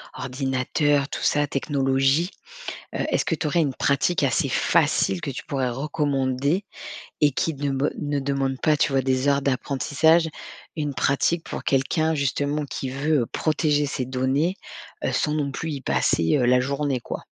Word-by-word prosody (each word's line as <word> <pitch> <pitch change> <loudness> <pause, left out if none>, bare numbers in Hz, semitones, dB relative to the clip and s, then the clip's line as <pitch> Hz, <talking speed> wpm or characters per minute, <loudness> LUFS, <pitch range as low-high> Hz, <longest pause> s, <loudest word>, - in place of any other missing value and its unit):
ordinateur, 135 +2 0
tout - - -5
ça, 145 0 +2
technologie, 135 +3 +1 0.6
heu, - - -3
est-ce - - +1
que - - 0
tu 155 -1 -1
aurais 165 +3 +2
une 140 -4 0
pratique 140 +8 +1
assez 135 -4 +1
facile 95 -2 +2
que 140 - -4
tu 130 - -7
pourrais 130 -3 -1
recommander 140 +3 0 0.6
et 150 - +6
qui 160 +4 -1
de 140 0 -2
be 135 +2 0
ne 145 -1 -1
demande 135 -1 -1
pas, 155 - +3
tu 145 -1 +1
vois, 135 -1 +2
des 130 +1 +1
heures 140 -1 +2
d'apprentissage? 145 +5 +2 0.5
Une 150 -3 -3
pratique 140 +6 +1
pour - - -6
quelqu'un, 155 +4 +1
justement, 145 +1 -1
qui 135 -1 -5
veut 140 -1 0
protéger 150 -2 +1
ses 135 -2 -3
données, 130 +7 0 0.5
heu, - - 0
sans 150 0 0
non 145 -2 -1
plus 160 +4 -4
y 140 -2 -5
passer, 85 - +1
heu, 125 - +2
la 125 +1 +4
journée, 140 0 -1
quoi? - - -7
140 Hz, 170 wpm, -24 LUFS, 130-150 Hz, 0.6 s, et